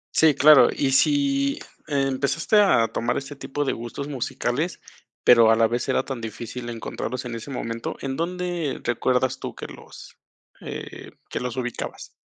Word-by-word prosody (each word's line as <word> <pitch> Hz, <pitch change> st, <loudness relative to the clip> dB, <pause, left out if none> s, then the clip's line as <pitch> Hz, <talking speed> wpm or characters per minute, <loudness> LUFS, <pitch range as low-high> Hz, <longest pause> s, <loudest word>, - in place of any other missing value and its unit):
Sí, 160 Hz, -3 st, +5 dB
claro, 150 Hz, 0 st, +7 dB
y 135 Hz, -2 st, 0 dB
si 280 Hz, -, +2 dB, 0.3 s
empezaste 140 Hz, +6 st, +1 dB
a 115 Hz, -, +4 dB
tomar 120 Hz, +1 st, -1 dB
este 140 Hz, +1 st, -6 dB
tipo 145 Hz, +1 st, -3 dB
de -, -, 0 dB
gustos 120 Hz, +4 st, -6 dB
musicales, 140 Hz, +3 st, -2 dB, 0.4 s
pero 115 Hz, -2 st, +7 dB
a 110 Hz, -, +6 dB
la 115 Hz, 0 st, +4 dB
vez 120 Hz, +2 st, -2 dB
era -, -, +2 dB
tan 130 Hz, -4 st, -5 dB
difícil 120 Hz, +2 st, -6 dB
encontrarlos 120 Hz, +2 st, -5 dB
en 120 Hz, -, -5 dB
ese 115 Hz, +4 st, -7 dB
momento, 115 Hz, -3 st, -4 dB
¿en 135 Hz, -1 st, -3 dB
dónde 175 Hz, -2 st, -2 dB
recuerdas 125 Hz, +2 st, 0 dB
tú -, -, -6 dB
que -, -, -7 dB
los, -, -, -12 dB, 0.5 s
eh, -, -, -8 dB, 0.2 s
que -, -, -2 dB
los 125 Hz, 0 st, -4 dB
ubicabas? 125 Hz, -2 st, -5 dB
135 Hz, 160 wpm, -24 LUFS, 120-150 Hz, 0.5 s, claro